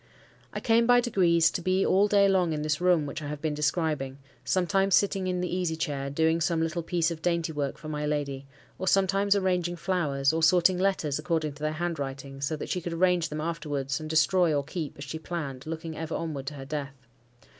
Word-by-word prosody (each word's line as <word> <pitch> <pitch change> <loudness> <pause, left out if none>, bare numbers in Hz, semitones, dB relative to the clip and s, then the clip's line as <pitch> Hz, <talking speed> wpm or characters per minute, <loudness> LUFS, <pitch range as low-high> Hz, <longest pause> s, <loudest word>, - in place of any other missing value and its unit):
I - - -4
came 230 0 +3
by 245 0 +6
degrees 180 -9 +3
to - - -3
be 185 +2 +1
all 195 +2 +4
day 200 -1 +4
long 185 -4 +2
in 150 -1 -3
this 150 +1 -1
room 180 -4 +3
which 145 +2 -5
I 145 - -5
have 150 0 -5
been 155 0 -2
describing; 150 -3 -1 0.3
sometimes 195 +1 +2
sitting 195 -2 +1
in 180 -1 -1
the 180 0 -2
easy 180 -3 -1
chair, 140 -3 -3
doing 160 +3 +1
some 170 -1 +1
little 165 +1 -1
piece 170 0 0
of 160 -1 -6
dainty 170 -1 0
work 145 -2 -2
for 155 - -10
my 150 -1 -3
lady, 140 -2 -3 0.3
or 190 - -3
sometimes 195 +1 +3
arranging 180 -3 0
flowers, 160 -6 0
or 165 - 0
sorting 180 +2 +4
letters 185 -7 0
according 155 -2 -1
to 150 - -16
their 155 0 -1
handwriting, 140 -5 -4
so 140 +3 -1
that 150 - -6
she 180 - -1
could 170 0 -4
arrange 175 -1 +2
them 150 0 -4
afterwards, 150 -4 -3
and 155 0 -7
destroy 165 +2 +3
or 145 - 0
keep, 155 +1 -5
as 140 - -7
she 150 +3 -6
planned, 155 -5 -5
looking 160 0 -5
ever 160 0 -4
onward 150 -5 -4
to 150 - -4
her 135 -1 -8
death. 140 -1 -5
160 Hz, 220 wpm, -27 LUFS, 150-180 Hz, 0.3 s, by